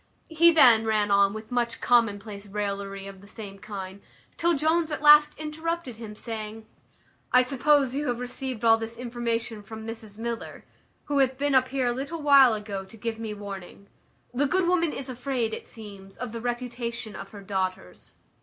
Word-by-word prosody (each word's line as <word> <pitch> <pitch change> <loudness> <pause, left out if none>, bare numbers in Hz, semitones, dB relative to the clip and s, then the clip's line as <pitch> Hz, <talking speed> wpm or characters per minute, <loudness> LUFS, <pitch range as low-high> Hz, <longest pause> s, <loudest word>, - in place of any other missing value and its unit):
He 335 +1 +6
then 245 -9 +7
ran 210 -2 +1
on 200 0 +5
with 220 +3 -8
much 240 -1 -1
commonplace 210 -3 +1
raillery 200 -1 -4
of 195 -1 -10
the 200 - -15
same 200 -2 -9
kind, 195 -1 -7 0.3
till 340 0 +2
Jones 320 +2 +1
at 300 - -4
last 300 0 +7
interrupted 310 -4 -4
him, 220 -2 -8
saying, 220 -1 -6 0.7
"I 250 0 +6
suppose 270 0 +2
you 290 +2 -2
have 245 - 0
received 250 -1 -5
all 225 0 +6
this 225 +1 -6
information 235 -2 -3
from 220 +2 -9
Mrs 225 -2 -7
Miller, 230 0 -5 0.4
who 290 -1 0
hath 265 -1 +2
been 285 +1 0
up 260 -1 +4
here 265 -1 -1
a 245 - +2
little 290 +5 -5
while 275 -5 +7
ago 205 -2 -5
to 210 +4 -14
give 225 0 -4
me 220 -2 -5
warning. 200 -1 -9 0.4
The 280 +3 +1
good 370 +4 +1
woman 340 -3 +2
is 270 - -6
afraid, 250 -3 -2
it - - -6
seems, 200 -4 -11
of 250 -2 -5
the 230 0 -6
reputation 240 -2 -4
of 195 - -8
her 205 - -11
daughters." 185 - -4
230 Hz, 180 wpm, -26 LUFS, 210-270 Hz, 0.7 s, then